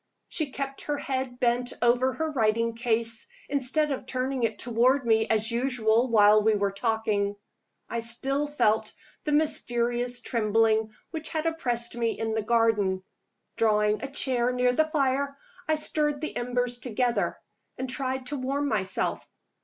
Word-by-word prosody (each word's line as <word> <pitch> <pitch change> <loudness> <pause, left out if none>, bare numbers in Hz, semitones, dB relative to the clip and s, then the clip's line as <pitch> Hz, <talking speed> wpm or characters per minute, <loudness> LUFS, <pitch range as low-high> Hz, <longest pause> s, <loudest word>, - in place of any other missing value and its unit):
She 310 -4 -1
kept 275 +1 -5
her 295 -1 -1
head 260 -3 -3
bent 245 0 +1
over 250 +2 +3
her 320 -1 -2
writing 230 -3 +1
case, 230 -1 0 0.2
instead 285 +2 0
of 260 -2 -4
turning 260 0 -2
it 225 -2 0
toward 245 +3 +2
me 220 -1 +3
as 220 +1 +1
usual 240 -1 +2
while 215 -2 +6
we 215 0 +3
were 200 -1 0
talking. 205 -1 -1 0.5
I 235 - -3
still 270 +5 0
felt 235 -7 +1 0.3
the 300 - -1
mysterious 245 -5 +1
trembling 220 -2 +1 0.2
which 320 -1 -4
had 315 0 -2
oppressed 245 -8 0
me 230 -1 -1
in 225 0 -2
the 220 - 0
garden. 210 -4 +1 0.5
Drawing 210 -1 +2
a 275 - -4
chair 250 -3 +1
near 250 0 +2
the 315 +5 +3
fire, 280 -2 0 0.3
I 315 - +3
stirred 300 -1 -1
the 310 - -5
embers 245 0 -1
together, 245 0 0 0.4
and 260 - -3
tried 260 -1 -3
to 285 +3 -3
warm 275 +3 -1
myself. 195 -6 -1
245 Hz, 155 wpm, -27 LUFS, 225-270 Hz, 0.5 s, while